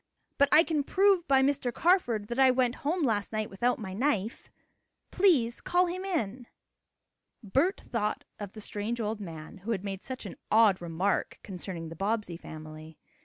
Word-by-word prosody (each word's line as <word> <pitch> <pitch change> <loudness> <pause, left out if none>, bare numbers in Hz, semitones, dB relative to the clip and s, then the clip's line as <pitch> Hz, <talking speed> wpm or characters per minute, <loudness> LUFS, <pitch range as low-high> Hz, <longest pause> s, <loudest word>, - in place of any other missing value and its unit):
But 280 0 +5
I 315 - +8
can 310 -4 0
prove 385 +2 +3
by 270 -1 +4
Mr. 275 -2 +1
Carford 240 - +2
that 240 +2 -3
I 265 -1 +7
went 250 -1 +2
home 325 +4 0
last 210 -6 0
night 215 -1 -2
without 240 +6 +1
my 190 -5 -6
knife. 225 -2 -1 0.6
Please 285 -12 +3
call 360 +1 +2
him 365 +2 -4
in." 255 - -2 1.0
Bert 280 - +1
thought 210 -3 -2 0.2
of 205 -2 -7
the 215 - -9
strange 210 +3 -4
old 215 -1 -2
man, 165 -1 -8
who 200 +5 -9
had 205 -5 -1
made 195 -1 -4
such 260 -2 -7
an 195 - -8
odd 215 -4 +5
remark 175 +4 -1
concerning 180 -4 -6
the 165 - -8
Bobbsey 205 0 -1
family. 155 -1 -10
225 Hz, 170 wpm, -29 LUFS, 195-280 Hz, 1.0 s, I